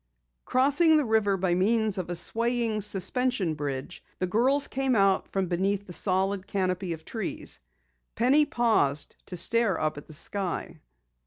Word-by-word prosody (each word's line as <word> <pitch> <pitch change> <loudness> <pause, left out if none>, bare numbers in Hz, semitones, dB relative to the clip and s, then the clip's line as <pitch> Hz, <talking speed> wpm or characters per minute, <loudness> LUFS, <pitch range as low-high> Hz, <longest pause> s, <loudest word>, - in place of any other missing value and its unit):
Crossing 290 +5 +3
the 300 - +1
river 220 -3 +1
by 180 -1 0
means 215 +2 +1
of 175 - -5
a 175 - -3
swaying, 230 +4 +1
suspension 205 0 +1
bridge, 140 -3 -6
the 185 - -1
girls 255 +9 +2
came 265 -1 -1
out 195 -2 +2
from 195 -1 -1
beneath 190 +3 -1
the 180 - -10
solid 190 +1 -1
canopy 185 -2 -2
of 160 -1 -11
trees. 220 -5 -3 0.6
Penny 265 +6 +4
paused 215 -12 0
to 180 - -4
stare 230 -1 +2
up 155 -1 -2
at - - -17
the 155 - -11
sky. 185 +3 -3
195 Hz, 155 wpm, -27 LUFS, 180-235 Hz, 0.6 s, Penny